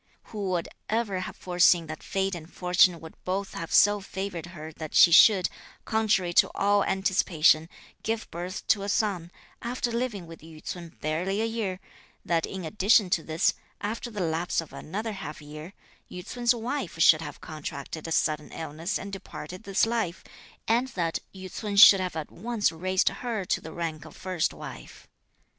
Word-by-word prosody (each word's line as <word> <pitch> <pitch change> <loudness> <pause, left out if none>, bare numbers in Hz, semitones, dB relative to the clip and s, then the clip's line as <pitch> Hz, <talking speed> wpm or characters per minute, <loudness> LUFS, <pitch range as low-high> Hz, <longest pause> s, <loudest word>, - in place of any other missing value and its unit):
Who 205 -3 -2
would 175 -2 -1 0.2
ever 215 -4 0
have 185 - -6
foreseen 175 -1 +3
that 155 0 -7
fate 195 0 -1
and 165 -1 -7
fortune 180 -1 +3
would 160 -1 -10
both 190 +2 -2
have 165 - -6
so 205 0 +5
favoured 190 -3 -5
her 160 -2 -9
that 155 -1 -7
she 170 - +8
should, 185 +1 +7 0.4
contrary 205 -5 +1
to - - -8
all 205 0 +3
anticipation, 170 -5 +2 0.3
give 225 0 -2
birth 180 +3 -5
to 205 - +4
a 200 - -3
son, 195 -6 0 0.3
after 240 0 -2
living 230 -6 -2
with 165 -1 -12
Yü 160 0 -12
ts'un 170 -2 -7
barely 175 +6 -1
a 225 - +1
year, 220 -5 -2 0.5
that 165 -2 +1
in 190 -3 -6
addition 200 +2 +3
to 165 - +2
this, 160 +1 +1 0.3
after 225 +3 -4
the 210 -4 -5
lapse 165 +1 0
of 165 - -6
another 215 +8 -4
half 190 -7 -7
year, 150 +3 -9 0.4
Yü 180 0 -8
ts'un's 240 +2 +1
wife 235 -4 -4
should 160 -1 +6
have 160 - -7
contracted 155 0 -7
a - - -6
sudden 150 -1 0
illness 165 +5 -4
and 200 0 -8
departed 185 0 -8
this 195 +2 +2
life, 225 -7 -2 0.4
and 235 +3 +2
that 165 -2 0
Yü 190 -1 -9
ts'un 205 +2 -5
should 200 -1 +10
have 185 -2 -3
at 155 -2 -5
once 220 -2 0
raised 185 +3 +1
her 230 -6 -4
to - - 0
the 160 - -8
rank 160 -2 -4
of - - -12
first 185 -3 -1
wife. - - -10
185 Hz, 180 wpm, -27 LUFS, 165-205 Hz, 0.5 s, should